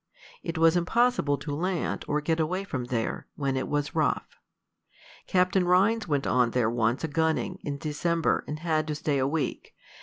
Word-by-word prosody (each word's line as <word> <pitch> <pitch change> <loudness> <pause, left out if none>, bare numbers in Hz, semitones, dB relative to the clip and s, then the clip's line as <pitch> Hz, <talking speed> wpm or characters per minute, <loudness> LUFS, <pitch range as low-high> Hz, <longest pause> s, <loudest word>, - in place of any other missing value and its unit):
It 165 -1 -4
was 165 +1 +5
impossible 180 -4 +2
to 145 0 -5
land, 175 +3 -2
or 150 +1 0
get 160 +2 0
away 180 +5 0
from 130 -10 -4
there, 120 -2 -3
when 140 -2 -1
it 130 - -2
was 145 -1 -1
rough. - - -1 0.9
Captain 185 0 +3
Rhines 195 +5 +3
went 145 -3 0
on 125 -2 +3
there 115 -2 +1
once 120 +3 0
a - - +1
gunning, 160 +4 0
in 140 -1 -4
December, 160 +3 0
and 150 - -4
had 155 -2 0
to 150 - -2
stay 145 -2 0
a 130 - +2
week. 155 +1 -3
155 Hz, 180 wpm, -27 LUFS, 140-175 Hz, 0.9 s, was